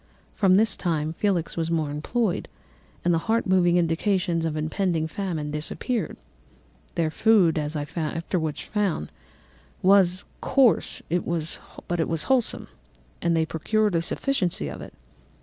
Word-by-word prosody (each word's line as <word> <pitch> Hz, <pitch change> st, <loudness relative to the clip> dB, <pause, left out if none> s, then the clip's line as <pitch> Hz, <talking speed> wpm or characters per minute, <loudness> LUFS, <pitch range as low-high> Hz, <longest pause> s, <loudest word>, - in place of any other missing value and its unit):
From 190 Hz, -3 st, +4 dB
this 215 Hz, +1 st, +3 dB
time 160 Hz, -3 st, -1 dB
Felix 180 Hz, -3 st, 0 dB
was 165 Hz, -1 st, -1 dB
more 160 Hz, -3 st, 0 dB
employed, 185 Hz, +7 st, -1 dB, 0.6 s
and 175 Hz, -, +4 dB
the 165 Hz, -, +2 dB
heart 230 Hz, +1 st, +2 dB
moving 180 Hz, -2 st, +4 dB
indications 175 Hz, 0 st, +1 dB
of 155 Hz, -1 st, -2 dB
impending 160 Hz, +1 st, 0 dB
famine 160 Hz, -5 st, -3 dB
disappeared. 165 Hz, -, -3 dB, 0.8 s
Their 165 Hz, -2 st, +1 dB
food, 185 Hz, -6 st, +4 dB
as 150 Hz, +1 st, -3 dB
I 145 Hz, -, -1 dB
afterwards 160 Hz, -1 st, -2 dB
found, 200 Hz, -, -1 dB, 0.7 s
was 185 Hz, -1 st, +4 dB, 0.2 s
coarse, 265 Hz, -5 st, +2 dB, 0.8 s
but 175 Hz, -1 st, -1 dB
it 160 Hz, -, 0 dB
was 165 Hz, -2 st, -1 dB
wholesome; 260 Hz, -4 st, +1 dB, 0.5 s
and 170 Hz, -1 st, +2 dB
they 160 Hz, -, +2 dB
procured 210 Hz, +6 st, 0 dB
a 165 Hz, -, +2 dB
sufficiency 180 Hz, -, -1 dB
of -, -, -7 dB
it. -, -, -10 dB
175 Hz, 135 wpm, -25 LUFS, 160-200 Hz, 0.8 s, From